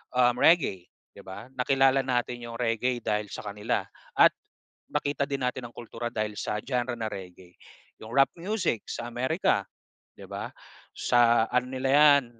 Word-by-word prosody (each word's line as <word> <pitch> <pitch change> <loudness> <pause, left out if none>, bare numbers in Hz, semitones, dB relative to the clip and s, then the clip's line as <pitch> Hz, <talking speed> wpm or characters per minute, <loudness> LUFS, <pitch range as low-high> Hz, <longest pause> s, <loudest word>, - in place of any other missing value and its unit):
um, 125 -1 +4
reggae, 145 - +4 0.3
'di - - -12
ba? 100 +4 -9
Nakilala 135 +1 +3
natin 125 -1 -1
'yong 115 0 -7
reggae 120 +1 0
dahil 105 0 -1
sa - - -6
kanila 105 0 -2 0.4
at - - +8 0.6
nakita 145 -1 -1
din 140 -1 -2
natin 125 -1 -3
ang - - -25
kultura 120 0 -5
dahil 110 -2 -2
sa 105 - -2
genre 125 -1 -1
na 115 -1 -2
reggae. 90 -2 -9 0.5
'Yong 110 - -9
rap 135 -1 +5
music, 185 - -1
sa 120 - -4
America, 120 - 0 0.5
'di - - -11
ba? - - -5 0.5
Sa 120 -2 +4
ano 125 0 +1
nila 130 0 -1
'yan, 145 -2 +7
120 Hz, 160 wpm, -27 LUFS, 115-135 Hz, 0.6 s, at